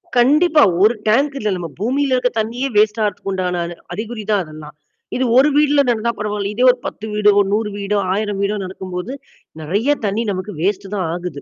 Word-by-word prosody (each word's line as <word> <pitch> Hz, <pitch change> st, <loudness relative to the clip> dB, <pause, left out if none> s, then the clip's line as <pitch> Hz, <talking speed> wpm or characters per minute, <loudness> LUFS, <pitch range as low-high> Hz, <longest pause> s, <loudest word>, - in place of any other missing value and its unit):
கண்டிப்பா. 300 Hz, +6 st, +4 dB, 0.2 s
ஒரு 215 Hz, +3 st, +5 dB
டேங்க் 275 Hz, +7 st, +2 dB
இல்ல. 215 Hz, -, -1 dB
நம்ம 175 Hz, -1 st, -5 dB
பூமியில 265 Hz, +5 st, 0 dB
இருக்க 250 Hz, 0 st, +1 dB
தண்ணியே 235 Hz, +5 st, -2 dB
வேஸ்ட் 210 Hz, +1 st, +3 dB
ஆறதுக்கு 205 Hz, -1 st, -2 dB
உண்டான 180 Hz, -2 st, -1 dB
அ 170 Hz, 0 st, -8 dB, 0.2 s
அறிகுறி 215 Hz, +3 st, -5 dB
தான் 205 Hz, -, +3 dB
அதெல்லாம். 155 Hz, -2 st, -11 dB, 0.4 s
இது 260 Hz, -, +1 dB
ஒரு 275 Hz, +3 st, +6 dB
வீட்ல 295 Hz, -1 st, +4 dB
நடந்தா 235 Hz, 0 st, +1 dB
பரவால்ல. 210 Hz, -1 st, -2 dB
இதே 245 Hz, -, +1 dB
ஒரு 250 Hz, -, -7 dB
1௦ 215 Hz, -, -5 dB
வீடு 210 Hz, -1 st, +4 dB
ஒரு 200 Hz, -, 0 dB
1௦௦ 210 Hz, 0 st, 0 dB
வீடோ, 205 Hz, 0 st, -1 dB
1௦௦௦ 205 Hz, 0 st, -2 dB
வீடோ 205 Hz, +1 st, 0 dB
நடக்கும்போது, 185 Hz, +4 st, -6 dB, 0.5 s
நெறைய 205 Hz, -, +1 dB
தண்ணீ 205 Hz, +3 st, 0 dB
நமக்கு 190 Hz, +2 st, -5 dB
வேஸ்ட்டு 195 Hz, +2 st, -1 dB
தான் 185 Hz, -4 st, -1 dB
ஆகுது. 175 Hz, -5 st, -6 dB
210 Hz, 190 wpm, -18 LUFS, 190-240 Hz, 0.5 s, ஒரு